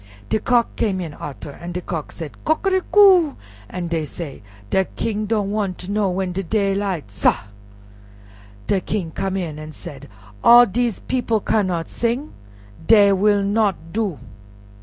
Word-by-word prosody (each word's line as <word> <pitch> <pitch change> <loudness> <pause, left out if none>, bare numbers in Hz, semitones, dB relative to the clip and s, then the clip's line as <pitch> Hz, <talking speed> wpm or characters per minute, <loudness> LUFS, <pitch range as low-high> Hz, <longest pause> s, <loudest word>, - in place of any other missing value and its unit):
De - - +1
Cock 240 0 +1
came 195 -4 0
in 165 -4 -5
arter, 145 0 -8
an' 175 +5 -8
de 180 - -3
Cock 165 -4 -5
said, 160 -3 -7
"Coquericou," 375 -1 +4 0.3
an' 180 -1 -4
dey 165 -2 -1
said, 150 -1 -7 0.3
"De 190 0 +3
King 215 +1 -3
don' 205 -2 0
wan' 205 -3 -1
ter 190 +3 -6
know 205 -2 +1
when 185 0 -2
de 185 +2 -2
daylight, 195 - -1
sah!" 100 - +1 1.2
De 190 - +1
King 180 -6 -3
came 190 +4 -2
in 160 -5 -4
an' 155 0 -8
said, 140 -3 -11 0.3
"All 240 +1 +9
dese 235 +1 -1
people 240 -4 0
cannot 185 -6 0
sing; 240 +6 -2 0.5
dey 205 -3 +7
will 200 +1 +3
not 205 -1 +2 0.2
do." 205 -7 -1
195 Hz, 155 wpm, -21 LUFS, 175-225 Hz, 1.2 s, All